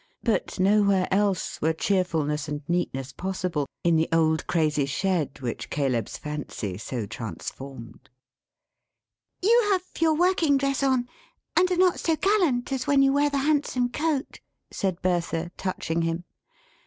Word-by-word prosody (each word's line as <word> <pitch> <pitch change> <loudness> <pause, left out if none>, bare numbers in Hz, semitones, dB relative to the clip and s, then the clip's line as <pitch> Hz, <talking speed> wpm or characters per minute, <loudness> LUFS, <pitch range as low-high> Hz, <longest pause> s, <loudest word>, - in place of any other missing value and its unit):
But 225 -4 -1
nowhere 200 -1 +3
else, 195 -1 0
were 160 +1 +2
cheerfulness 160 -5 0
and 150 0 -4
neatness 140 -7 -1
possible, 180 -6 -2 0.2
in 170 -1 +4
the 160 - +1
old 160 -1 +2
crazy 150 -4 +1
shed 170 -1 -1
which 120 -3 -4
Caleb's 130 -7 -1
fancy 145 -10 -5
so 120 -1 -4
transformed. 115 +3 -8 1.3
"You 460 +2 +5
have 375 -2 +2 0.2
your 320 -1 +3
working 335 -4 +3
dress 275 0 0
on, 260 -3 +2 0.5
and 365 +1 +4
are 360 - 0
not 365 -1 +3
so 325 - +1
gallant 330 -11 +1
as 265 -2 -2
when 280 -1 +5
you 270 0 +4
wear 290 +1 +3
the 285 - -1
handsome 275 -3 +1
coat?" 295 +1 -2 0.3
said 190 -2 -2
Bertha, 175 -1 0
touching 170 -3 -2
him. 165 +1 -1
185 Hz, 140 wpm, -26 LUFS, -, 1.3 s, You